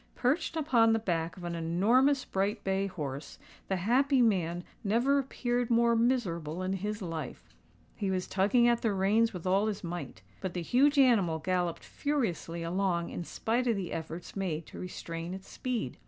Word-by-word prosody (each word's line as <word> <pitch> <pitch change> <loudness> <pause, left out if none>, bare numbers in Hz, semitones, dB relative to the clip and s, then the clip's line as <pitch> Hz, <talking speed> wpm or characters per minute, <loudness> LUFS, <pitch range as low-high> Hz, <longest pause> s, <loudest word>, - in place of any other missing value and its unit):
Perched 315 +6 0
upon 240 -8 +4
the - - +3
back 170 -6 -2
of 180 - -10
an 175 0 -3
enormous 220 - +2
bright 195 +2 -1
bay 195 +1 0
horse, 145 -6 -6 0.3
the 190 - 0
"happy 255 +9 +2
man" 175 -7 +2 0.2
never 240 +7 +3
appeared 245 -2 -1
more 235 0 +4
miserable 185 -9 0
in 185 +1 -1
his 205 +2 -3
life. 165 -3 -6 0.4
He 200 -4 -2
was 185 -1 -1
tugging 210 +6 +3
at 235 -1 +2
the 220 -3 +1
reins 210 +4 +3
with 180 -3 -8
all 195 +3 +3
his 210 -2 -3
might; 175 0 -6 0.2
but 185 -2 -4
the 175 - -2
huge 280 - +3
animal 220 -12 +4
galloped 175 +1 -1
furiously 205 - -2
along 175 0 0
in 175 - -4
spite 235 +8 -1
of 230 - +3
the 190 -3 -4
efforts 165 +1 -6
made 170 -5 -2
to - - -11
restrain 170 -1 -5
its 190 0 -11
speed. 240 - -3
195 Hz, 175 wpm, -30 LUFS, 175-235 Hz, 0.4 s, upon